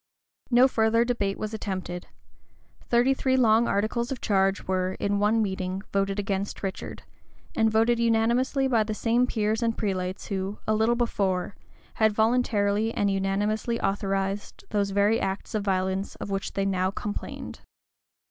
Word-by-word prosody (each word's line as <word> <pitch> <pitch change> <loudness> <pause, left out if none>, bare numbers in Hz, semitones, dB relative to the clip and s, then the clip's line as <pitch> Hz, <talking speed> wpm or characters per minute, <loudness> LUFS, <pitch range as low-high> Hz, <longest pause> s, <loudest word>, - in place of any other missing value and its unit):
No 250 +1 +6
further 230 -1 +2
debate 205 -5 -1
was 215 0 -4
attempted: 185 -4 -4 0.8
thirty 245 +3 +4
three 260 -1 +1
long 230 -1 +4
articles 230 +4 0
of 265 - -3
charge 195 -1 +1
were, 185 0 0
in 200 +1 -1
one 215 +2 +3
meeting, 190 -1 -3
voted 195 0 0
against 200 -1 -3
Richard; 190 -1 -5 0.5
and 225 0 +3
voted 225 +2 +2
unanimously 235 +4 +2
by 235 -4 +3
the 215 0 -4
same 240 +3 +2
peers 220 -1 0
and 230 -1 0
prelates 185 -3 -2
who, 195 0 -3
a 215 - +1
little 220 +2 +2
before, 200 -6 -1 0.4
had 220 -1 +2
voluntarily 220 -2 +2
and 205 -3 0
unanimously 205 +4 0
authorized 195 0 -2
those 205 -2 +1
very 205 +3 +2
acts 195 +4 -3
of 215 - 0
violence 190 0 -1
of 200 - -6
which 195 0 -3
they 195 - -1
now 185 -1 +1
complained. 205 +1 -6
210 Hz, 150 wpm, -26 LUFS, 195-230 Hz, 0.8 s, No